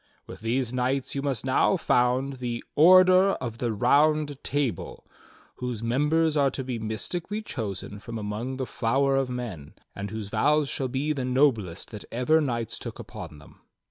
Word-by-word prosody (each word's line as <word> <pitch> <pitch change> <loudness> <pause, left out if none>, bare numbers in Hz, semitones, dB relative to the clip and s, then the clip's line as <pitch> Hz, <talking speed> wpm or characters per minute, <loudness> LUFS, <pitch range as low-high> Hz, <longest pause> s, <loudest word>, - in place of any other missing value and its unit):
With - - -10
these 120 +2 -1
knights 130 +1 -1
you 140 - -2
must 135 -4 -1
now 135 +8 +3
found 130 -1 +1
the 120 -2 -3
ORDER 185 +4 +7
OF 115 -2 -6
THE 120 -2 0
ROUND 145 +5 +2
TABLE, 140 - -2 0.5
whose 125 -3 -4
members 150 +6 +2
are 140 -2 +3
to 135 0 -5
be 125 -2 -4
mystically 175 - -3
chosen 105 - -5
from 115 +2 -7
among 110 +5 -4
the 130 - -2
flower 135 +4 +1
of 135 -1 +1
men, 115 - -6 0.2
and 100 0 -5
whose 110 -1 -6
vows 145 +6 +2
shall 135 - -1
be 135 +4 -1
the 135 -3 -3
noblest 125 - +1
that 105 -2 -8
ever 140 +7 +3
knights 120 -6 -3
took - - -7
upon 75 - -9
them." 75 - -17
130 Hz, 170 wpm, -26 LUFS, 115-145 Hz, 0.5 s, ORDER